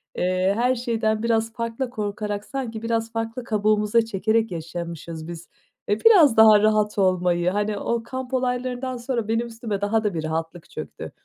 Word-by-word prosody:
eee, 185 +1 +1
her 250 +2 +2
şeyden 225 -3 -1
biraz 225 -1 +1
farklı 230 +2 -3
korkarak 210 -2 -4
sanki 240 -5 -5
biraz 230 0 -1
farklı 225 +2 -3
kabuğumuza 215 0 +2
çekerek 220 +1 0
yaşamışız 165 -1 -6
biz. 170 -1 -9 0.4
Eee, 205 +1 +1
biraz 330 - +7
daha 220 -1 +8
rahat 215 -1 +2
olmayı, 180 -2 +2
hani 205 +2 -1
o 235 +3 -2
kamp 260 +1 -6
olaylarından 250 0 -1
sonra 235 -2 -3
benim 225 +2 0
üstüme 225 -3 -5
daha 220 +2 +1
da 210 -2 0
bir 160 -2 -3
rahatlık 160 +1 -4
çöktü. - - -8
220 Hz, 160 wpm, -23 LUFS, 195-235 Hz, 0.4 s, daha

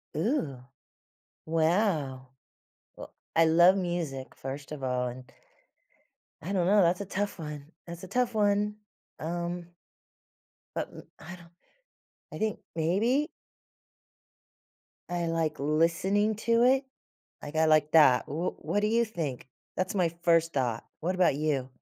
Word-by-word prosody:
Ooh, 155 - -1 0.8
wow. 160 -5 0 0.7
Wel - - -10 0.2
I 165 - +5
love 175 +4 +6
music, 170 -8 -3
first 135 +2 -7
of 145 -3 -6
all, 125 -1 0
and 125 +2 -10 1.1
I 175 +6 -5
don't 185 -3 +1
know. 205 +3 +5
That's 180 +2 +2
a - - -4
tough 200 +1 -3
one. 150 0 -7
That's 170 +1 -9
a - - -7
tough 245 +4 0
one, 210 0 +1 0.4
um 175 +1 -4 1.1
but - - -2
m - - -11 0.2
I 175 +3 -9
don't 170 -1 -17 0.8
I - - -6
think, 215 -1 -1
maybe? 220 - +1 1.8
I 175 -1 -1
like 165 -2 -1
listening 170 +8 +2
to 230 0 +4
it- 265 +2 +4 0.6
like, 145 - -8
I 160 0 +4
like 155 -1 +3
that. 145 -6 +6
W 165 +5 -2
what 205 - -1
do 210 - +1
you 230 +2 +3
think? 155 - -5 0.3
That's 185 +2 -1
my 180 -4 +2
first 165 -1 +3
thought. 120 -5 -1 0.2
What 180 +4 -1
about 180 -5 +3
you? 145 -4 -1
170 Hz, 140 wpm, -29 LUFS, 150-200 Hz, 1.8 s, love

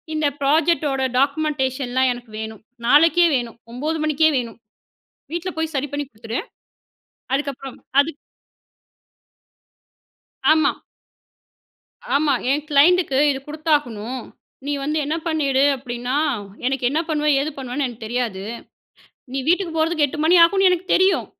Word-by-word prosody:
"இந்த 310 -1 +1
ப்ராஜெக்ட்டோட 290 -1 +2 0.2
டாக்குமென்டேஷன்லாம் 265 -3 0
எனக்கு 245 -2 -12
வேணும். 220 -1 -7 0.3
நாளைக்கே 330 +6 +5
வேணும். 240 -3 -3 0.2
9 305 +6 -2
மணிக்கே 310 +1 +3
வேணும். 235 -2 -5 0.8
வீட்ல 355 +2 -3
போய் 320 -1 -2
சரி 280 +2 -1
பண்ணி 290 0 -2
குடுத்துரு." 225 +1 -5 0.9
அதுக்கப்புறம் 275 -2 -4 0.2
அது, 285 +3 +1 2.4
ஆமா. 310 -2 +4 1.4
ஆமா. 290 0 +3 0.2
"என் 290 +1 0
க்ளைண்டுக்கு 300 0 +4
இது 270 - -3
குடுத்தாகணும். 260 -7 -1 0.4
நீ 290 - -1
வந்து 300 +2 -1
என்ன 305 +3 -1
பண்ணிடு. 280 -4 +1
அப்பிடீன்னா, 245 0 -4 0.5
எனக்கு 260 -1 0
என்ன 295 +4 0
பண்ணுவே, 300 -1 +1
ஏது 305 +2 -2
பண்ணுவேன்னு 265 +1 -3
எனக்கு 235 -2 -9
தெரியாது. 225 -4 -2 0.9
நீ 270 - -2
வீட்டுக்கு 355 0 +2
போறதுக்கு 315 -1 +2
8 285 - -8
மணி 345 +3 +5
ஆகும்னு 385 +2 +4
எனக்கு 360 0 -1
தெரியும். 380 +1 +3
285 Hz, 120 wpm, -21 LUFS, 255-315 Hz, 2.4 s, நாளைக்கே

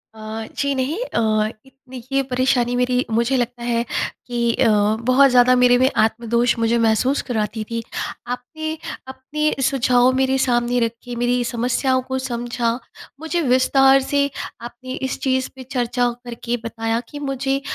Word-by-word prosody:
अ, 220 0 -6
जी 280 0 0
नहीं 265 +6 -1
अ, - - -2 0.5
इतनी 265 -1 -12
ये 275 0 +2
परेशानी 250 -1 +1
मेरी 250 0 +1
मुझे 235 +4 +2
लगता 240 0 -2
है 235 -1 0 0.4
कि 235 -1 0
अ, 255 - +2 0.4
बहुत 265 +2 +5
ज़्यादा 250 0 +5
मेरे 250 0 +5
में 260 +1 +4
आत्मदोष 235 +2 +2
मुझे 230 +1 +2
महसूस 230 +5 +2
कराती 220 -1 -2
थी। 230 0 -2 0.5
आपके, 280 +6 -4 0.3
अपने 290 +4 -2
सुझाव 250 -1 +3
मेरे 265 0 +2
सामने 245 -1 +1
रखे, 235 +1 -3
मेरी 245 +1 +1
समस्याओं 250 +2 0
को 260 - 0
समझा, 240 -2 -2 0.5
मुझे 320 +2 -1
विस्तार 270 0 +4
से 280 +1 +1 0.3
आपने 240 +2 -8
इस 260 - -4
चीज़ 260 -1 0
पे 260 - -9
चर्चा 245 -1 0 0.2
करके 240 0 -3
बताया 225 0 -2
कि 290 - -8
मुझे 270 -1 -1
250 Hz, 150 wpm, -21 LUFS, 235-265 Hz, 0.5 s, बहुत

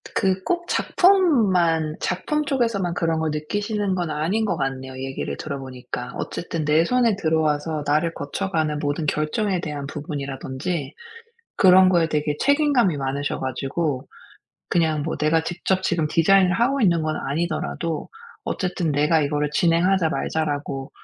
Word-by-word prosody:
그 190 -1 +1
꼭 345 - -1
작품만 200 - +3
작품 300 +12 -1
쪽에서만 230 -10 0
그런 165 -2 0
걸 160 0 0
느끼시는 205 +6 -2
건 175 -3 -2
아닌 165 +9 0
것 185 -5 -1
같네요 135 -2 -3
얘기를 135 0 -4
들어 140 -2 -5
보니까. 125 -1 -7
어쨌든 165 -2 -4
내 155 +2 +3
손에 240 -1 +2
들어와서 155 -3 0
나를 155 +3 +1
거쳐가는 155 0 -2
모든 145 +2 -2
결정에 175 +7 0
대한 145 -3 -5
부분이라든지 140 +1 -4 0.6
그런 185 0 +7
거에 170 -3 +3
되게 150 -1 -1
책임감이 280 - +3
많으셔 140 +1 -2
가지고 135 +2 -2 0.6
그냥 160 -3 +1
뭐 160 - -3
내가 155 +2 +2
직접 185 +2 -1
지금 170 -4 0
디자인을 185 +3 +4
하고 250 +8 +1
있는 170 -7 +3
건 155 0 -1
아니더라도 165 +1 -3 0.4
어쨌든 180 -4 -2
내가 150 +3 +3
이거를 150 0 -1
"진행하자. 175 +1 +3
말자."라고 145 -4 -2
160 Hz, 335 characters per minute, -23 LUFS, 150-190 Hz, 0.6 s, 그런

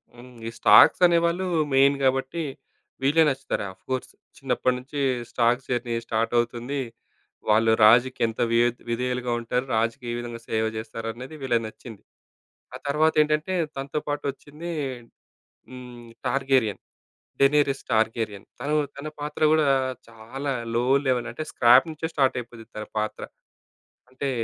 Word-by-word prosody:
హ్మ్. 125 +1 -13 0.2
ఈ - - -2
స్టాక్స్ 105 - +7
అనేవాళ్ళు 170 +2 +1 0.3
మెయిన్ 135 +1 +5
గాబట్టి 135 +5 0 0.6
వీళ్ళే 145 +4 +4
నచ్చుతారు 135 -5 -3
ఆఫ్‍కోర్స్ 130 +6 -5 0.3
చిన్నప్పటి 130 -1 0
నుంచి 135 +3 -7 0.3
స్టాక్స్ 120 +2 +1
జర్నీ 120 -1 -1
స్టార్ట్ 115 0 -1
అవుతుంది. 120 +4 -1 0.7
వాళ్ళు 110 +1 +4
రాజుకి 120 +4 +4
ఎంత 115 - -7
విఎద్ 120 +1 +2
విధేయులుగా 125 +1 -2
ఉంటారు? 125 +2 -2
రాజుకి 115 +4 -1
ఏ - - -2
విధంగా 120 -1 -6
సేవ 110 0 +1
జేస్తరనేది 115 +5 -6
వీళ్ళది 120 -4 0
నచ్చింది. 110 -1 -12 0.7
ఆ - - -4
తర్వాతేంటంటే 155 +2 +2 0.2
తనతో 135 +2 -3
పాటు 145 0 -2
వచ్చింది 150 +5 -9 1.0
హ్మ్. 125 -2 -11 0.2
'టార్గేరియన్. 130 -5 +1 0.6
Daenerys 140 0 +3
Targaryen.' 110 -2 -1
తను 145 +3 0 0.2
తన 140 +2 -7
పాత్ర 150 +1 -6
గూడా 155 -2 +3 0.4
చాలా 115 +5 -6 0.2
లో 120 - +2 0.2
లెవెల్ 125 -2 +1
అంటే 155 +6 -5
స్క్రాప్ 125 +4 +6
నుంచే 160 +1 -4
స్టార్టయిపోద్ది 125 -4 -1
తన 105 - -5
పాత్ర. 110 0 -3 0.9
అంటే 135 +2 -4
125 Hz, 125 wpm, -25 LUFS, 115-140 Hz, 1.0 s, స్టాక్స్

